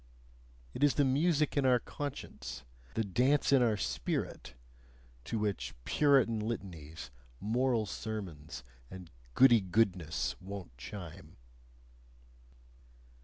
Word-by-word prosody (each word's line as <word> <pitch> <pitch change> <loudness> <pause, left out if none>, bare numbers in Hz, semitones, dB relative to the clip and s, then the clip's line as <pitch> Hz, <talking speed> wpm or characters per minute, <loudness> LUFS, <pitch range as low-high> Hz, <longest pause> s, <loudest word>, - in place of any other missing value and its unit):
It 140 - -2
is 145 - +5
the 145 - +4
music 150 +3 +2
in 140 - +2
our 130 -1 +5
conscience, 135 - -6 0.3
the 115 - +1
dance 125 +10 +2
in 135 - +6
our 115 -3 +3
spirit, - - -3 0.7
to 115 - -2
which 105 - -2
Puritan 135 -6 +4
litanies, 85 - -5 0.3
moral 120 +1 +1
sermons, 95 - -6 0.3
and 90 -3 -10 0.2
goody 120 -4 +7
goodness 95 -4 0
won't 95 -6 -8
chime. 85 +6 -9
110 Hz, 105 wpm, -32 LUFS, 90-130 Hz, 0.7 s, goody